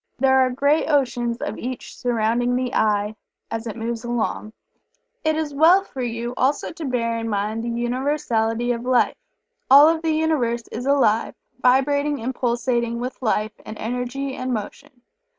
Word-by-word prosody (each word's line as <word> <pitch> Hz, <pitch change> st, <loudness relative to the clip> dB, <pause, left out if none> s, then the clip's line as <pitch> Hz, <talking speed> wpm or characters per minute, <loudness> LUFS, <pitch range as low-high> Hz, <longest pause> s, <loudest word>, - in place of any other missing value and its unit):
There 265 Hz, 0 st, +4 dB
are 260 Hz, -1 st, +4 dB
great 285 Hz, +5 st, +1 dB
oceans 245 Hz, -5 st, +1 dB
of -, -, -4 dB
each 255 Hz, 0 st, -6 dB
surrounding 240 Hz, +1 st, 0 dB
the 250 Hz, -1 st, -2 dB
"I" 210 Hz, 0 st, +1 dB, 0.4 s
as 225 Hz, +1 st, -4 dB
it 220 Hz, -, -5 dB
moves 230 Hz, 0 st, -4 dB
along. 235 Hz, -2 st, -2 dB, 0.7 s
It 315 Hz, 0 st, +2 dB
is 310 Hz, -2 st, -2 dB
well 335 Hz, +7 st, +5 dB
for 270 Hz, -9 st, -7 dB
you 235 Hz, 0 st, -3 dB
also 275 Hz, +3 st, +1 dB
to 330 Hz, -1 st, -7 dB
bear 230 Hz, -3 st, -1 dB
in 225 Hz, 0 st, -3 dB
mind 210 Hz, +2 st, -2 dB
the 235 Hz, -, -3 dB
Universality 240 Hz, -1 st, 0 dB
of 235 Hz, -1 st, -2 dB
Life. 250 Hz, -1 st, +2 dB, 0.6 s
All 280 Hz, +3 st, +9 dB
of 325 Hz, 0 st, +2 dB
the 325 Hz, -, -1 dB
Universe 250 Hz, -8 st, 0 dB
is 250 Hz, -, -5 dB
alive, 245 Hz, -6 st, +2 dB, 0.2 s
vibrating 285 Hz, +3 st, +2 dB
and 250 Hz, +4 st, -3 dB
pulsating 235 Hz, -1 st, -1 dB
with 250 Hz, +2 st, -5 dB
life 215 Hz, -2 st, 0 dB
and 215 Hz, -, -8 dB
energy 250 Hz, +4 st, -3 dB
and 255 Hz, 0 st, -4 dB
motion. 245 Hz, +3 st, -6 dB
245 Hz, 165 wpm, -22 LUFS, 230-275 Hz, 0.7 s, All